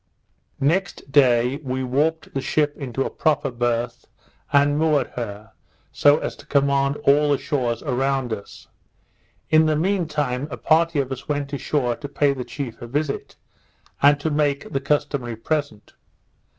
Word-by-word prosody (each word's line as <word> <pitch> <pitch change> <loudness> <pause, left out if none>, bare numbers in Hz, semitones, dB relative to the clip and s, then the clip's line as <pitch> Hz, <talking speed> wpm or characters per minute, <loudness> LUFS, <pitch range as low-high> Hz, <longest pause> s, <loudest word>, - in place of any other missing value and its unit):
Next 165 0 -1
day 125 -2 +4
we 130 -3 -3
warped 150 +6 0
the 135 - -1
ship 150 +1 0
into 135 -1 -3
a - - -3
proper 145 -3 0
birth, 120 0 -2 0.5
and 145 0 +4
moored 150 -3 +2
her, 110 -2 -6 0.4
so 145 +1 +5
as - - -4
to - - -15
command 140 0 +2
all 145 +1 +4
the 140 - +3
shores 120 -6 -2
around 135 -2 0
us. 100 -2 -9 0.8
In 155 0 +5
the 155 - +2
mean 180 +2 0
time 145 -3 -2
a 130 - -6
party 165 0 +2
of 135 -1 -2
us 130 +2 -7
went 145 -1 -2
ashore 135 -3 0
to 145 - -7
pay 140 0 +2
the 130 -2 -5
chief 130 -3 -6
a 120 - -6
visit, 145 +3 -3 0.7
and 145 +1 +5
to 155 +2 -2
make 145 -1 0
the 135 - 0
customary 140 -4 -1
present. 145 -2 -3
140 Hz, 160 wpm, -22 LUFS, 125-150 Hz, 0.8 s, so